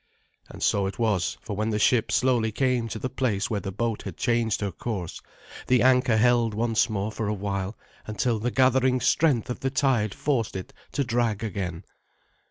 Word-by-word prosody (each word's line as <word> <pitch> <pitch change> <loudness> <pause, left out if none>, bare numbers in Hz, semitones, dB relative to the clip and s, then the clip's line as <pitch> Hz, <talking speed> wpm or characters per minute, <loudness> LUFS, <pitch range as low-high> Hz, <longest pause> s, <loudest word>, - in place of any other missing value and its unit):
And - - -8
so 100 -1 +2
it 95 - -6
was, 105 -6 0
for 105 - -5
when 110 +2 -1
the 105 - 0
ship 115 +2 +2
slowly 125 -4 +2
came 125 0 0
to 110 - -5
the 130 - -3
place 120 -6 -1
where 105 - 0
the 95 - -5
boat 115 +2 -2
had 95 -5 -7
changed 115 -3 0
her 100 -1 -1
course, 95 -2 -5 0.5
the 125 -1 +4
anchor 125 -3 +4
held 120 -1 +3
once 115 +1 +1
more 105 0 -2
for 110 -1 -3
a 105 - -1
while 100 0 -3 0.3
until 110 +2 0
the 120 +4 -1
gathering 130 0 +3
strength 135 -3 +2
of - - -5
the 135 - -1
tide 130 -7 +1
forced 130 -7 -1
it 95 - -6 0.2
to 140 - +1
drag 115 -4 0
again. 90 -5 -4
115 Hz, 190 wpm, -26 LUFS, 105-125 Hz, 0.5 s, the